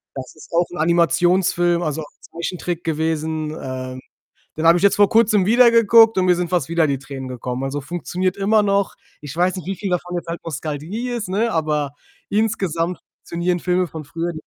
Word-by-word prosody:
Das 130 -1 -8
ist 155 - -15
auch 175 +1 +3
'n 175 - -7
Animationsfilm, 175 +2 +2
also 155 -2 -2
ein 150 - -7 0.2
Zeichentrick 175 0 -5
gewesen. 160 -1 -2
Ähm, 130 -1 -6 0.6
den 160 +1 0
habe 170 +1 +6
ich 180 - -2
jetzt 200 - +4
vor 205 -1 +5
Kurzem 215 -3 +3
wieder 235 +3 +6
geguckt 230 -1 +6
und 185 -1 +2
mir 180 -1 +4
sind 175 0 -2
fast 175 -6 0
wieder 170 -1 +2
die 140 -2 -1
Tränen 135 -1 -8
gekommen. 125 +1 -4
Also, 135 +2 -3
funktioniert 175 +4 -3
immer 210 +2 +3
noch. 200 -1 +1 0.3
Ich 145 0 -8
weiß 180 +2 +1
nicht, 185 - -7
wie 195 0 -3
viel 195 +1 -4
davon 180 0 -2
jetzt 170 - -5
halt 170 +1 -4
Nostalgie 160 - -4
ist, 235 -5 -3
ne, 215 +5 0
aber 150 -3 0 0.4
insgesamt 185 -6 -1 0.2
funktionieren 175 +1 -2
Filme 180 +1 +1
von 160 -2 -8
früher 165 +4 -4
175 Hz, 195 wpm, -20 LUFS, 155-190 Hz, 0.6 s, habe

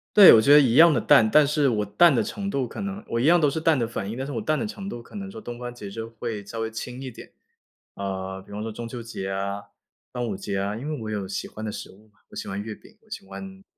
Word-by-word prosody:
对， 205 -3 +11
我 110 - +7
觉 140 +6 +6
得 150 - +10
一 125 -5 +3
样 165 +4 +8
地 - - +2
淡， 110 - +5
但 150 +5 +6
是 145 -1 +2
我 105 -3 0
淡 170 - +5
的 115 -4 +2
程 200 - -4
度 135 -8 -1
可 200 - -7
能 200 +1 -5
我 115 - -1
一 125 - +1
样 175 +3 +6
都 150 - +3
是 160 +3 -2
淡 160 -2 +3
的 115 -3 0
反 105 -3 -4
应， 115 - -5
但 130 - -3
是 145 - -6
我 115 - -2
淡 155 +8 0
的 - - -2
程 200 -2 -6
度 120 -7 -7
可 215 - -16
能 195 -1 -6
说 - - -9
东 120 0 -8
方 120 0 -6
节 105 -4 -9
日 110 +3 -6
会 115 -2 -6
稍 115 +3 -7
微 110 0 -3
轻 125 +3 -6
一 130 -2 -6
点。 - - -13 0.6
呃， 95 -1 -5
比 - - -14
方 105 +1 -5
说 110 - -4
中 115 +2 -7
秋 120 0 -7
节 95 -4 -5
啊、 100 +1 -3 0.5
端 125 -1 -3
午 105 -5 -3
节 100 0 -4
啊， 100 +2 -2
因 130 +6 -6
为 150 -4 -4
我 110 -1 -5
有 100 -2 -3
喜 95 - -4
欢 110 - -8
的 105 - -3
食 - - -7
物 105 +3 -20
嘛， 105 -1 -33
我 - - -15
喜 - - -5
欢 100 +1 -4
月 110 0 -6
饼， 220 - -19
我 220 - -27
喜 200 -2 -7
欢 195 - -8
粽 190 0 -10
子。 - - -33
115 Hz, 340 characters per minute, -25 LUFS, 105-150 Hz, 0.6 s, 对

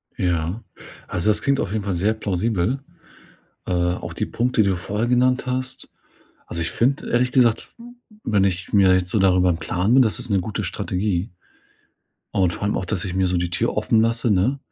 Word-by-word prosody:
Ja. 90 +4 -1 0.4
Also, 90 +4 0
das 105 - +2
klingt 140 -1 +1
auf 95 - -2
jeden 105 -1 -2
Fall 100 -1 -2
sehr 100 +5 +1
plausibel, 110 +2 -1 0.9
äh, - - -2
auch 90 0 -1
die - - -2
Punkte, 120 -2 +1
die 100 - +2
du 95 - 0
vorher 105 +6 -2
genannt 125 +1 +2
hast. 130 0 -3 0.6
Also, 85 - -4
ich 85 - -2
finde 135 +4 0
ehrlich 125 +1 +1
gesagt, 120 -4 +2
w - - -12 0.4
wenn 105 -3 +2
ich 90 -1 -2
mir 95 -2 +5
jetzt 90 -1 +1
so 105 - +1
darüber 90 -1 +4
im 80 - 0
Klaren 90 +6 0
bin, 135 - +7
das 110 -2 +2
ist 125 -1 -7
'ne 100 -2 +2
gute 105 +3 -4
Strategie. 95 +1 -2 1.0
Und 90 -3 +2
vor - - -6
allem 105 - 0
auch, - - -2
dass 90 -2 -2
ich 90 - -4
mir 95 0 +2
so 90 - 0
die 85 0 -1
Tür - - -1
offen 110 - +2
lasse, 115 +1 +1
ne? 105 +8 +2
100 Hz, 210 wpm, -22 LUFS, 90-115 Hz, 1.0 s, bin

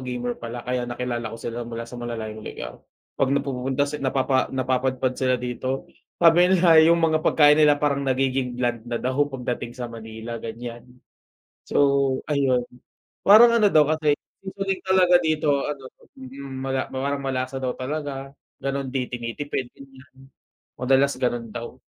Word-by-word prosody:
gamer 125 -1 -3
pala 120 +1 -6
kaya 125 -1 -2
nakilala 120 -1 -3
ko - - -6
sila 120 +1 -5
mula 115 0 -6
sa 115 +1 -10
malalayong 110 -2 -5
lugar. 65 -2 -8 0.4
'Pag 135 - +2
napupunta 135 0 -1
sa 145 +1 -5
napapa 130 0 +1
napapadpad 130 0 0
sila 130 0 +1
dito, 125 +2 -4 0.3
sabi 175 +1 +5
nila 170 -3 +6
yung 170 0 +4
mga 155 -1 +2
pagkain 150 -1 +5
nila 150 -1 +6
parang 145 -1 0
nagiging 130 -1 0
bland 120 -2 -1
na 120 - -2
daw 130 +4 0
pagdating 125 -3 -4
sa 125 -1 -5
Manila, 110 +1 -7
ganyan. 115 +1 -7 0.8
So, - - -4 0.5
ayun. 135 -4 +2 0.6
Parang 235 +4 +8
ano 215 -3 +5
daw 155 -1 +6
kasi 155 -1 +2 0.3
seasoning 195 0 -3
talaga 185 -1 +5
dito 155 -1 0 0.2
ano 135 -3 -6 0.3
mm, 135 +1 -9
mala 135 0 -1
mawar 140 +2 -1
malasa 135 -1 -3
daw 130 -1 -2
talaga, 135 0 -4 0.3
gano'n, 135 0 -2
'di 130 -2 -2
tinitipid, 125 +2 -4
ganyan. 135 0 -17 0.5
Madalas 135 +2 +3
gano'n 120 -3 -2
daw. 120 +2 -7
130 Hz, 150 wpm, -24 LUFS, 120-145 Hz, 0.8 s, Parang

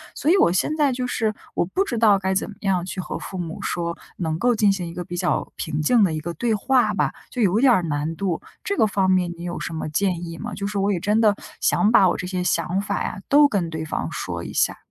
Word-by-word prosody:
所 310 - +1
以 390 - +5
我 - - +5
现 245 +11 +1
在 285 -4 +3
就 250 0 -2
是 220 -3 -1 0.2
我 - - +1
不 390 - +3
知 240 - -3
道 215 -3 +5
该 190 0 0
怎 - - 0
么 210 - -10
样 185 -3 0
去 190 - -6
和 - - -5
父 185 - -7
母 165 -1 -5
说 170 -1 -2 0.2
能 160 -3 -2
够 245 +4 +2
进 210 -2 +4
行 185 -3 -2
一 165 - -7
个 175 0 -5
比 175 +1 -6
较 175 -5 -1
平 155 -1 -3
静 220 +7 +4
的 170 -5 +2
一 155 - -2
个 170 +3 -5
对 230 +5 0
话 255 +4 +2
吧， - - +1 0.2
就 250 - -3
有 205 +2 +3
点 260 -2 +6
儿 185 - +3
难 155 +1 -2
度， 185 -3 -1 0.2
这 400 - -2
个 - - +5
方 195 -2 +1
面 180 -2 +2
你 170 - -12
有 175 0 -4
什 165 - -5
么 160 - -4
建 175 +2 0
议 165 0 -7
吗？ - - -6
就 200 0 -3
是 205 -1 -4
我 200 +1 +1
也 175 - -1
真 210 +4 +1
的 215 -3 +4 0.2
想 215 +1 +3
把 195 - +6
我 - - 0
这 180 - -4
些 180 -1 -2
想 180 +1 0
法 205 - -2
呀， - - -4
都 290 +1 +7
跟 190 -9 -1
对 160 0 -4
方 160 - -3
说 - - -4
一 - - -7
下。 - - +1
190 Hz, 300 characters per minute, -23 LUFS, 170-220 Hz, 0.2 s, 都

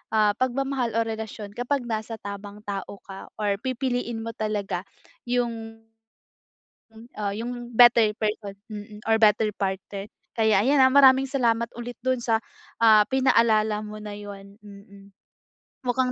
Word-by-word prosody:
ah, 210 -1 +4
pagmamahal 255 -2 -1
o 230 - +3
relasyon 220 -2 -6
kapag 245 +5 -2
nasa 225 -1 -4
tamang 205 0 -9
tao 200 -1 -5
ka 195 -1 -10
or 205 -2 -1
pipiliin 245 -2 -2
mo 230 - -4
talaga 205 -3 -3 0.4
yung 230 -2 -3 1.3
ah, 205 -2 -2
yung 240 +2 -6
better 230 -2 +6
person, 210 -2 -2 0.2
mm, 210 -1 -9
or 225 - +5
better 215 0 +4
partner. 195 +1 -4 0.3
Kaya 220 -3 +4
ayan, 275 +2 +4
ah, 260 0 +6
maraming 270 -1 +6
salamat 235 -4 +1
ulit, 240 0 -7
dun 260 0 +1
sa, 230 -1 +1 0.4
ah, 215 -2 +7
pinaalala 220 -5 +3
mo 210 0 -8
na 210 -1 -7
yun. 200 -1 -10
Mm. 200 -1 -14 0.8
Mukhang 250 +1 +1
220 Hz, 140 wpm, -25 LUFS, 205-245 Hz, 1.3 s, ah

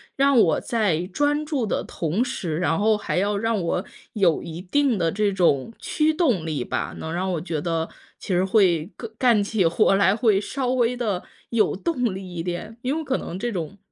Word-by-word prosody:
让 275 -2 +4
我 165 - +4
在 195 -8 0
专 290 +8 0
注 290 -6 -1
的 205 - -1
同 170 +8 -1
时， 180 -11 -3
然 170 -2 +1
后 215 +1 +3
还 210 - -3
要 200 +2 +1
让 225 +1 0
我 180 +1 -1 0.3
有 185 -7 +2
一 165 +1 -7
定 255 +4 +1
的 165 -1 +1
这 205 0 +1
种 170 - +2
驱 310 0 +1
动 250 - +1
力 150 -6 -2
吧， - - -3
能 160 - -5
让 185 +2 -1
我 160 - -2
觉 165 -3 -3
得 165 +1 -2 0.3
其 - - -11
实 185 -1 +2
会 185 -5 +2
个 230 - -7
干 235 -5 +4
起 200 -2 0
活 170 +4 +3
来， 195 0 +4
会 220 -4 +3
稍 260 +5 -3
微 250 -1 +2
地 210 -7 -2 0.3
有 215 -6 +2
动 250 - -1
力 190 - -6
一 165 - -2
点， 185 +6 -5
因 265 +4 0
为 320 - -2
可 265 -2 0
能 175 - -6
这 240 +2 -2
种 185 0 -5
200 Hz, 225 characters per minute, -24 LUFS, 175-240 Hz, 0.3 s, 让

